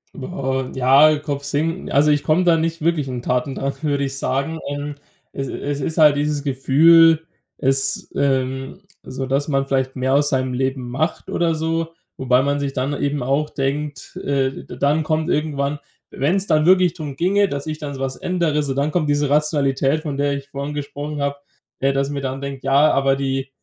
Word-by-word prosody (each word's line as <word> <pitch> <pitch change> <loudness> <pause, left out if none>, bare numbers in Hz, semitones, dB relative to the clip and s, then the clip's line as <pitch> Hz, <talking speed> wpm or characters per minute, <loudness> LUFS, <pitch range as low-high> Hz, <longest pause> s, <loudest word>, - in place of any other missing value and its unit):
Boah, 130 -3 -3
ja, 140 +4 +5
Kopf 140 -1 -4
senken 160 +5 -2
also 150 +2 +4
ich 145 -1 +1
komme 165 +4 +2
da 170 -2 +4
nicht 165 0 -2
wirklich 160 -4 +1
in 125 -2 -4
Tatendrang, 135 +2 -1
würde 145 -2 0
ich 135 0 -3
sagen. 140 +5 -2
Ähm, 145 0 -4 0.4
es 135 -1 -4
es 145 +2 -4
ist 160 +4 -3
halt 150 -2 +6
dieses 145 -1 -1
Gefühl 160 +4 +5 0.3
es 135 0 +1
ähm, 135 -1 -1 0.2
so 130 +1 -5
dass 135 +3 0
man 135 -2 0
vielleicht 135 -1 -1
mehr 130 +1 0
aus 145 +1 +3
seinem 130 -1 0
Leben 130 -1 -2
macht 155 +7 -2
oder 165 -2 +1
so. 165 +1 -2 0.2
Wobei 130 -1 +3
man 140 0 0
sich 140 -1 -3
dann 130 +3 -1
eben 145 -2 -1
auch 140 +4 0
denkt 145 +1 -3
äh, 135 -1 -1
d - - -9
dann 145 +4 +2
kommt 155 +2 -1
irgendwann 145 -2 -1 0.3
wenn's 185 +8 0
dann 155 -3 +2
wirklich 185 -1 +5
drum 150 -5 -7
ginge, 195 +6 +2
dass 140 -3 -4
ich 155 -1 -4
dann 145 -2 -6
so 130 - -8
was 135 -1 -3
ändere 170 -5 0
so 140 -2 -2
dann 140 +3 0
kommt 155 -3 0
diese 145 -1 +1
Rationalität, 145 -1 +1
von 145 -3 -4
der 140 0 +1
ich 140 0 -6
vorhin 140 +1 -5
gesprochen 145 0 -5
habe, 140 0 -1 0.4
äh, 135 0 +1
dass 135 0 0
ich - - -4
mir 140 - -3
dann 135 0 -4
denke: 140 -1 -6
„Ja, 140 +3 +4
aber 135 0 +2
die 135 0 -2
140 Hz, 200 wpm, -20 LUFS, 135-155 Hz, 0.4 s, halt